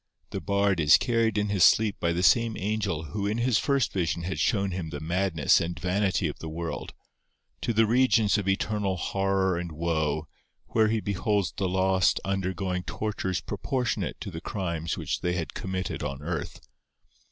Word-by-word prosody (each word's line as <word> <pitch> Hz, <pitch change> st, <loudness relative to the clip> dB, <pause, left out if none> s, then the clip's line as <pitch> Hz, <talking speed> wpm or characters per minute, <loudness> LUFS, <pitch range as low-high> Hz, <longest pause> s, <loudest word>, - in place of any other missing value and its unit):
The -, -, -4 dB
Bard 100 Hz, -2 st, +1 dB
is 75 Hz, -2 st, +7 dB
carried 115 Hz, -3 st, +1 dB
in 105 Hz, 0 st, 0 dB
his 100 Hz, -4 st, +2 dB
sleep 110 Hz, -2 st, +4 dB
by 85 Hz, -, +1 dB
the 85 Hz, +2 st, -1 dB
same 110 Hz, +3 st, +4 dB
angel 100 Hz, -5 st, -1 dB
who 100 Hz, -1 st, -1 dB
in 105 Hz, +2 st, -1 dB
his 120 Hz, -2 st, +2 dB
first 140 Hz, -4 st, +1 dB
vision 85 Hz, -2 st, -1 dB
had 95 Hz, +2 st, -3 dB
shown 100 Hz, -3 st, +1 dB
him 90 Hz, -3 st, -4 dB
the 75 Hz, -, -5 dB
madness 85 Hz, -1 st, +2 dB
and 85 Hz, +1 st, -3 dB
vanity 95 Hz, 0 st, +1 dB
of 75 Hz, -, -6 dB
the 80 Hz, -, -6 dB
world, 85 Hz, +1 st, -5 dB, 0.7 s
to -, -, 0 dB
the 115 Hz, 0 st, +4 dB
regions 115 Hz, -2 st, +3 dB
of 100 Hz, -, -4 dB
eternal 100 Hz, -1 st, 0 dB
horror 95 Hz, 0 st, 0 dB
and 85 Hz, -1 st, -5 dB
woe, 80 Hz, -1 st, -1 dB, 0.4 s
where 110 Hz, -1 st, +3 dB
he 110 Hz, 0 st, 0 dB
beholds 100 Hz, -2 st, 0 dB
the 95 Hz, -2 st, -1 dB
lost 95 Hz, 0 st, +2 dB
undergoing 95 Hz, -1 st, -1 dB
tortures 95 Hz, -2 st, -3 dB
proportionate 125 Hz, -3 st, -2 dB
to 100 Hz, -, -5 dB
the 80 Hz, -1 st, -7 dB
crimes 85 Hz, -6 st, -3 dB
which -, -, -3 dB
they 90 Hz, 0 st, 0 dB
had 85 Hz, -3 st, -3 dB
committed 95 Hz, -1 st, -4 dB
on 70 Hz, -1 st, -4 dB
earth. 80 Hz, -3 st, -4 dB
95 Hz, 175 wpm, -27 LUFS, 85-105 Hz, 0.7 s, is